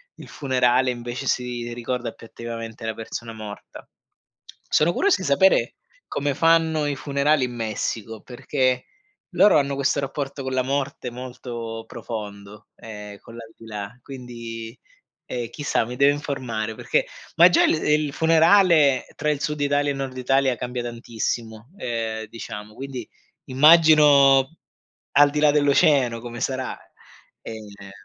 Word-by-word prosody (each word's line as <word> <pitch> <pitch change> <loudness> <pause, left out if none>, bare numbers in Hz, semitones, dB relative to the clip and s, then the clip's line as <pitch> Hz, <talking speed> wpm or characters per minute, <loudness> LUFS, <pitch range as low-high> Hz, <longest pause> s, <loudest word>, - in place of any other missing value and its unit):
il - - -12
funerale, 130 -2 +1
invece 120 +2 -6
si 120 -1 -2
ricorda 120 0 -3
più - - -14
attivamente 115 -1 -7
la 110 - -2
persona 115 0 -7
morta. 105 -2 -10 0.8
Sono 170 +3 +3
curioso 400 0 +2
di - - -3
sapere 190 +8 +3 0.3
come 145 0 -2
fanno 160 -1 +3
i 145 - -1
funerali 140 +1 +1
in 125 - -6
Messico, 110 0 -4
perché 130 0 -1 0.5
loro 205 - +5
hanno 140 0 -1
questo 140 +1 +1
rapporto 140 0 -4
con 130 0 -4
la 130 -1 +1
morte 135 -2 -3
molto 120 -2 -7
profondo, 105 -2 -8
ehm, 105 -2 -9
con 115 - -14
l'aldilà, 110 -1 -9
quindi 115 -3 -8 0.5
e 120 -2 -4
chissà, 145 -4 -1
mi 125 - -6
devo 140 +1 +5
informare 125 -7 -4
perché - - 0 0.3
ma 170 +2 +8
già - - +4
il - - +3
il 150 -1 +1
funerale 165 -3 +4
tra 150 - -1
il 145 -1 -1
sud 150 -1 -2
Italia 145 0 +1
e - - +1
il 135 - -7
nord 130 -1 -5
Italia 130 0 +1
cambia 125 0 -4
tantissimo, 115 0 -5
ehm, 115 - -3
diciamo, 105 -1 -9
quindi 130 -4 -7 0.4
immagino 145 -1 +6 0.5
al 145 0 +6
di 150 +1 -1
là 150 -1 +5
dell'oceano 140 -4 +3
come 120 0 -8
sarà. 130 -1 -3 0.6
Ehm, 100 -3 -10
125 Hz, 140 wpm, -23 LUFS, 115-145 Hz, 0.8 s, ma